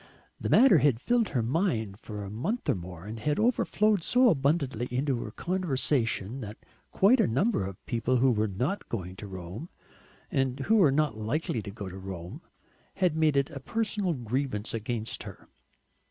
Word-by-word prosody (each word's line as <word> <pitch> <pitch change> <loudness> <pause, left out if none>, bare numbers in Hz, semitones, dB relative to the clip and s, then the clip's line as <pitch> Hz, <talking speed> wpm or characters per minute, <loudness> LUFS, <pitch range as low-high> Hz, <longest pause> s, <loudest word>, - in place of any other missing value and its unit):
The - - -3
matter 230 - +7
had 135 -4 +3
filled 235 - +1
her 125 -5 0
mind 115 - -1
for 105 -2 -7
a 100 - -7
month 175 - -3
or - - +4
more, 90 -1 -8
and 110 +2 -6
had 150 +6 0
overflowed 215 -3 +2
so 250 +5 +4
abundantly 135 - 0
into 130 0 0
her - - -5
conversation 135 - -1
that 105 -1 -7 0.3
quite 225 +7 +4
a - - +4
number 180 - +1
of 95 -2 -10
people 120 +2 0
who 130 +1 +4
were 110 -1 +1
not 125 - -2
going 95 -5 -4
to 105 - -8
Rome, 95 - -7 0.6
and 135 0 0
who 220 +10 +3
were 170 -9 +6
not 145 -5 +1
likely 115 +2 -2
to 100 - -8
go 100 -1 -7
to 95 +1 -8
Rome, 90 -2 -7 0.5
had 180 -5 +1
made 155 -3 +3
it 140 0 +1
a 140 - -6
personal 205 - -1
grievance 120 -2 -2
against 115 0 -2
her. - - -10
130 Hz, 180 wpm, -28 LUFS, 105-165 Hz, 0.6 s, matter